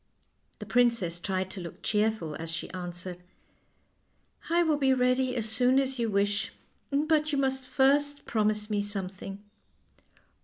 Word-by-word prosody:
The - - -8
princess 230 -9 +2
tried 185 +1 -2
to 190 - -6
look 170 -2 -9
cheerful, 210 -7 0
as 165 0 -5
she 170 +1 -4
answered: 180 0 -6 0.7
" - - -23
I 340 +1 +4
will 315 -3 +2
be 265 -2 +4
ready 255 0 +2
as 225 -3 -2
soon 250 +4 +3
as 265 -1 -1
you 230 -1 +1
wish; 205 +1 +1 0.4
but 305 +1 +2
you 285 - 0
must 265 -1 0
first 285 +2 +2
promise 210 -1 +1
me 205 -1 +1
something." 195 0 -4
220 Hz, 150 wpm, -29 LUFS, 190-265 Hz, 0.7 s, I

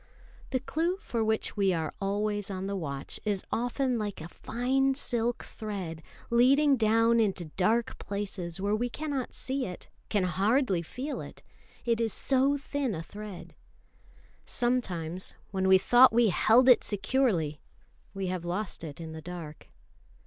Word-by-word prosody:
The 260 - 0
clue 330 +7 -1
for 235 - -2
which 220 0 0
we 195 -3 +2
are 160 -2 -2
always 205 +1 -1
on 190 -1 -4
the 200 0 -2
watch 140 -7 -5
is 205 -3 -1
often 245 +1 0
like 205 -2 -4
a 160 - -7
fine 265 +7 0
silk 240 -3 -1
thread 190 -7 -6 0.3
leading 275 +4 +5
down 225 0 +3
into 195 -5 +1
dark 220 +5 +1
places 195 -4 -4
where 200 +2 +1
we 245 +3 -1
cannot 285 -1 -4
see 265 -2 -2
it, 180 - -9 0.2
can 205 -3 +1
hardly 195 - +2
feel 255 - -5
it; - - -11 0.4
it 230 -1 +1
is 225 -2 +1
so 275 +1 +2
thin 275 -5 -2
a 160 - -5
thread. 205 0 -9 0.9
Sometimes, 185 -9 -1 0.2
when 190 -1 0
we 190 0 +8
thought 245 +6 +6
we 230 -1 +4
held 235 +7 +4
it 250 - +7
securely, 200 - 0 0.5
we 195 -1 -2
have 180 -1 -3
lost 180 +1 -2
it 150 -2 -7
in 165 -1 -7
the 160 0 -7
dark. 165 -3 -8
215 Hz, 155 wpm, -29 LUFS, 185-245 Hz, 0.9 s, we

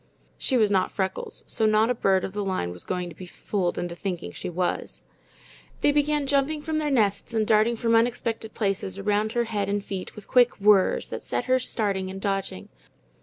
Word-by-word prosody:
She 260 - +2
was 215 -3 +3
not 190 -2 +2
Freckles, 190 -1 -3
so 220 - +1
not 215 +2 +3
a - - +3
bird 195 -5 +2
of 190 - -7
the 205 0 -2
line 185 - -2
was 90 0 -7
going 180 -1 -2
to 165 - -12
be 185 - -9
fooled 180 0 -2
into 175 -1 -3
thinking 175 - -4
she - - -6
was. 180 +1 -3 0.8
They 290 - +4
began 295 0 +1
jumping 285 +2 +1
from 315 0 -1
their 300 -1 -1
nests 220 -4 +1
and 220 -1 +2
darting 220 +2 +3
from 230 0 0
unexpected 230 -1 0
places 195 -2 -1
around 210 +2 0
her 240 - +2
head 210 -4 -2
and 205 0 -1
feet, 190 -2 -6
with 210 - -11
quick 245 -3 +4
whirs, 200 -1 +3
that - - -4
kept - - -1
her 255 0 +3
starting 200 -6 -1
and 190 0 -6
dodging. 195 - -3
210 Hz, 205 wpm, -25 LUFS, 190-235 Hz, 0.8 s, They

